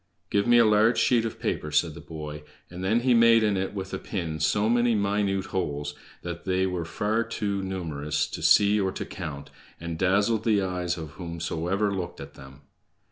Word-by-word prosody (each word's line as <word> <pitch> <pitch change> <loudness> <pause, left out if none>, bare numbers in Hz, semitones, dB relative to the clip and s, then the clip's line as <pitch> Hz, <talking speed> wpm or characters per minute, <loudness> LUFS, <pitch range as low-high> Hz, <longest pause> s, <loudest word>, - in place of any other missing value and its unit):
"Give 100 +2 +2
me 120 0 +6
a 120 - +6
large 110 +2 +4
sheet 120 -2 +3
of 115 - -5
paper," 75 - -2
said 75 +2 +1
the - - -10
boy; 75 -2 -7 0.3
and 90 +1 -7
then 110 +5 +2
he 125 0 +3
made 115 -1 +6
in 105 -2 +2
it 95 +2 -2
with 95 -1 -5
a - - -2
pin 80 -5 -4
so 105 +7 +2
many 120 0 +3
minute 100 -1 0
holes 75 -5 -2 0.3
that 85 -1 -6
they 95 0 +1
were 90 -3 -2
far 110 +6 0
too 105 -3 -3
numerous 75 -5 -2
to - - -6
see 105 0 +5
or 95 -1 0
to - - -5
count, 75 -6 -7 0.3
and 85 -1 -5
dazzled 100 +4 +2
the 110 -3 +3
eyes 90 -1 -2
of 80 -3 -7
whomsoever 85 +4 -2
looked 90 -3 -5
at - - -9
them. 65 +1 -14
95 Hz, 195 wpm, -26 LUFS, 85-105 Hz, 0.3 s, me